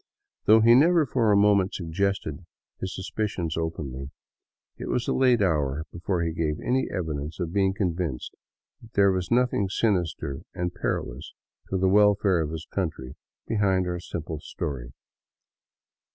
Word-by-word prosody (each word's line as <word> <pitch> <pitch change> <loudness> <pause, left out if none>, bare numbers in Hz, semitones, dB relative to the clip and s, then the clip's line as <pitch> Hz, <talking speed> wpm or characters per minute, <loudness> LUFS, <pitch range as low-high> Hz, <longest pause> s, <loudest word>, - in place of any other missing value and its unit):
Though 110 +1 +7
he 115 +2 +7
never 160 +5 +5
for 115 -4 +2
a 100 - +5
moment 100 -1 +3
suggested 90 -2 -2 0.4
his 95 -1 -4
suspicions 95 -4 -3
openly, 70 -5 -4 0.7
it - - -6
was 125 - -1
a - - +1
late 125 -4 +4
hour 75 -4 0
before 85 0 -1
he 85 - -1
gave 80 -2 -1
any 130 +2 0
evidence 80 -2 -4
of 85 -2 -3
being 95 -1 +2
convinced 85 - -2 0.5
that 115 -1 -16
there 100 -1 +5
was 90 -2 -2
nothing 120 -5 +2
sinister 90 -10 -1
and 90 0 -2
perilous 75 -6 -3 0.4
to 95 - 0
the 95 +1 +2
welfare 100 -2 +4
of 75 - -2
his 80 0 -6
country 75 -9 -3 0.3
be 110 - -1
hind 95 -3 +2
our 90 0 -2
simple 80 -2 -5
story. 65 -5 -5
90 Hz, 150 wpm, -26 LUFS, 80-100 Hz, 0.7 s, Though